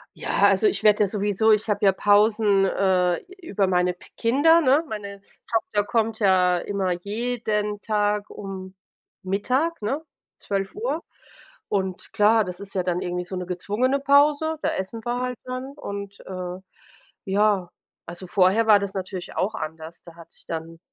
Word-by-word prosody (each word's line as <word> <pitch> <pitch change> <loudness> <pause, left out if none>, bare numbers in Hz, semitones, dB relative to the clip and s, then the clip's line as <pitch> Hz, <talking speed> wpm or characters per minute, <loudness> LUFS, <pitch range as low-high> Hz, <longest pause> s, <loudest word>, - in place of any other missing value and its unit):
Ja, - - +2
also 435 - +3
ich 400 - -1
werde 210 0 +5
ja - - +2
sowieso 205 +2 +1
ich 215 +1 +2
habe 205 0 +1
ja 195 - +7
Pausen, 205 0 +3
äh, 185 -2 +2 0.2
über 200 - 0
meine 180 -1 +2
p 180 - -18
Kinder, 290 +8 +4
ne, 285 +3 +4
meine 200 -3 -7 0.3
Tochter 215 -2 0
kommt 225 +1 -1
ja 185 -3 +4
immer 195 0 -2
jeden 210 +2 -2
Tag 210 -1 0
um 190 -2 -8 0.5
Mittag, 255 - -1
ne, 270 +9 -2 0.4
12:00. 315 - -3 0.7
Und 190 -2 -3
klar, 215 +1 +4
das 180 0 -7
ist 200 -1 -9
ja 185 - +1
dann 180 0 -1
irgendwie 180 0 -3
so 185 +1 -6
'ne 180 - -4
gezwungene 210 +9 0
Pause, 290 +3 +3
da - - +1
essen 205 +4 -4
wir 240 +1 -1
halt 250 -1 -3
dann 255 +2 -5
und, 200 -7 -7
äh, 185 -1 -6 0.7
ja, 200 -2 +2 0.4
also 175 +2 -7
vorher 195 +5 +3
war 210 -2 +7
das 200 -1 -4
natürlich 185 -2 -6
auch 200 +4 0
anders, 160 +2 -7
da 170 -1 -14
hatte 170 0 -15
ich - - -16
dann 165 0 -6
205 Hz, 165 wpm, -24 LUFS, 185-225 Hz, 0.7 s, ja